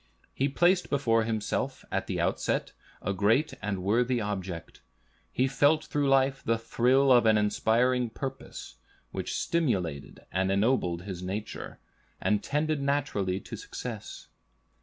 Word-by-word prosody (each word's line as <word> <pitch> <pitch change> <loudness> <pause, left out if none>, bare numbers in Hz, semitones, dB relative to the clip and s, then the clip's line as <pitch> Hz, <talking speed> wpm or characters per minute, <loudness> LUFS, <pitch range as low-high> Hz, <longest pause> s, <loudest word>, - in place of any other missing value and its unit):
He 135 +2 0
placed 175 +6 +3
before 115 -5 +2
himself 110 -2 -2
at - - -1
the - - -2
outset - - 0 0.3
a 100 - 0
great 110 - +2
and 100 -3 -3
worthy 120 +5 +2
object; 95 -5 -5 0.5
he 130 - +2
felt 145 +3 +3
through 145 -1 0
life 135 0 +3
the 115 0 +1
thrill 125 +4 +3
of 120 -3 +6
an 110 -1 +5
inspiring 120 +4 +2
purpose, 130 - -7 0.3
which - - -3
stimulated 95 - -1
and 95 +1 +1
ennobled 100 -5 +1
his 95 -2 -6
nature, 100 +4 -5 0.4
and 105 -1 +1
tended 150 0 0
naturally 135 -10 0
to - - -8
success. - - -7
115 Hz, 135 wpm, -28 LUFS, 100-135 Hz, 0.5 s, of